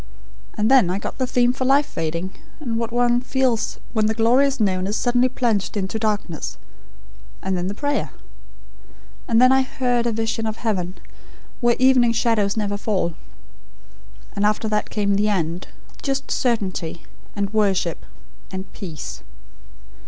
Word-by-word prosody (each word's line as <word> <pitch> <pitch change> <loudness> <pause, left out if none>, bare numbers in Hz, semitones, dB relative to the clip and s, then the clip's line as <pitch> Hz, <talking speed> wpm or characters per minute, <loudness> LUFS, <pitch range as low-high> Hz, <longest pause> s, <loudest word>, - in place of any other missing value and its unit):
And 215 +3 +2
then 255 -10 +6
I 185 - 0
got 205 - -6
the 255 - +1
theme 245 -1 +3
for 260 - -3
life 275 +3 +4
fading, 170 - -3 0.3
and 235 -7 -2
what 230 0 -2
one 240 0 +2
feels 255 -3 0 0.2
when 215 -2 +2
the 220 - 0
glorious 260 +5 +3
noon 190 -3 +1
is 205 - -1
suddenly 245 +1 +2
plunged 225 -6 0
into 195 +2 -2
darkness; 205 -7 -2 0.9
and 190 0 0
then 180 0 -1
the 200 - -3
prayer. 285 +4 -1 1.2
And 230 -1 +3
then, 255 +1 +7
I 265 0 +5
HEARD 245 -2 0
a - - +1
vision 225 0 -1
of 220 0 -3
heaven, 185 -5 -2 0.6
where 240 -2 +3
evening 255 -2 +5
shadows 220 -3 +1
never 205 -1 -1
fall: 195 -5 0 1.2
And 200 - 0
after 215 +1 +1
that 210 0 0
came 200 -2 +1
the 210 +1 +2
end; 170 -3 -1 0.3
just 275 0 -2
certainty, 190 -9 -1 0.3
and 200 0 -2
worship, 195 -5 +1 0.5
and 190 0 -6
peace. 155 - -7
220 Hz, 150 wpm, -22 LUFS, 195-245 Hz, 1.2 s, then